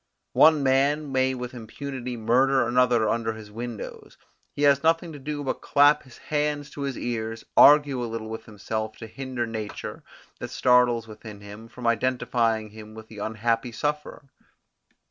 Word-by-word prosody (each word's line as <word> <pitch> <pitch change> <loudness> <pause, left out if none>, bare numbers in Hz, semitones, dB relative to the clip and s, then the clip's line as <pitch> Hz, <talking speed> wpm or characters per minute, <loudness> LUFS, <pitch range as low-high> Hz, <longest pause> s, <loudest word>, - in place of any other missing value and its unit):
One 155 -2 +6
man 140 +2 +2
may 130 0 +1
with 125 0 -6
impunity 125 +1 -6
murder 125 +3 +3
another 120 -2 +3
under 115 0 -1
his 110 -1 -11
windows; 115 0 -8 0.4
he 145 - -2
has 140 -1 +5
nothing 165 +1 +1
to 145 - -9
do 145 +1 -4
but 135 - -3
clap 145 +1 +4
his 130 - -16
hands 150 -1 -2
to 145 - -8
his 140 -2 -3
ears, 115 -2 -4
argue 145 -4 +6
a 120 - -4
little 110 -1 -5
with 110 0 -7
himself 110 0 -5
to - - -8
hinder 130 +1 -4
nature, 110 -2 -6 0.4
that - - -6
startles 125 -2 +3
within 105 -1 -11
him, 105 +2 -11
from 120 +1 -10
identifying 115 -2 0
him 110 0 -12
with 110 0 -11
the 110 - -10
unhappy 115 +3 -1
sufferer. 150 +3 -4
120 Hz, 165 wpm, -25 LUFS, 110-140 Hz, 0.4 s, One